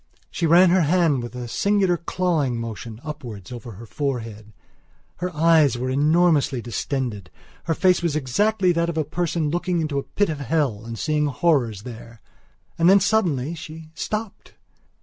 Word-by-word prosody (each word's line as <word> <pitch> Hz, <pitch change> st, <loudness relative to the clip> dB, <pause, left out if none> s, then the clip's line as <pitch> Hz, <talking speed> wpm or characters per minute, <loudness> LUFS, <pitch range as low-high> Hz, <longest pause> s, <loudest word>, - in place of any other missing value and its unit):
She 170 Hz, -, -1 dB
ran 175 Hz, +2 st, +6 dB
her 185 Hz, 0 st, +4 dB
hand 160 Hz, -4 st, +2 dB
with 120 Hz, +1 st, -8 dB
a 125 Hz, -1 st, -5 dB
singular 195 Hz, -, +2 dB
clawing 170 Hz, -8 st, -1 dB
motion 115 Hz, -1 st, -7 dB
upwards 120 Hz, -, -8 dB
over 120 Hz, -1 st, -8 dB
her 110 Hz, +5 st, -11 dB
forehead. 115 Hz, -6 st, -4 dB, 0.7 s
Her 180 Hz, +1 st, -2 dB
eyes 155 Hz, -5 st, +4 dB
were 130 Hz, +1 st, -2 dB
enormously 150 Hz, -1 st, +3 dB
distended; 120 Hz, -, -4 dB, 0.4 s
her 165 Hz, -, 0 dB
face 185 Hz, +2 st, +3 dB
was 170 Hz, -3 st, -1 dB
exactly 185 Hz, -, +1 dB
that 170 Hz, 0 st, 0 dB
of 165 Hz, -, -4 dB
a 155 Hz, -, +2 dB
person 160 Hz, 0 st, -2 dB
looking 175 Hz, +1 st, -1 dB
into 155 Hz, -3 st, -2 dB
the -, -, +1 dB
pit 205 Hz, -2 st, +2 dB
of 155 Hz, -2 st, -3 dB
hell 135 Hz, -6 st, -1 dB
and 115 Hz, 0 st, -6 dB
seeing 150 Hz, +1 st, 0 dB
horrors 130 Hz, -, +1 dB
there. 115 Hz, -1 st, -10 dB, 0.6 s
And 170 Hz, +2 st, +5 dB
then 195 Hz, +1 st, +7 dB
suddenly 175 Hz, -, +1 dB
she 160 Hz, -1 st, -10 dB
stopped. 215 Hz, +3 st, -5 dB
150 Hz, 165 wpm, -23 LUFS, 120-175 Hz, 0.7 s, then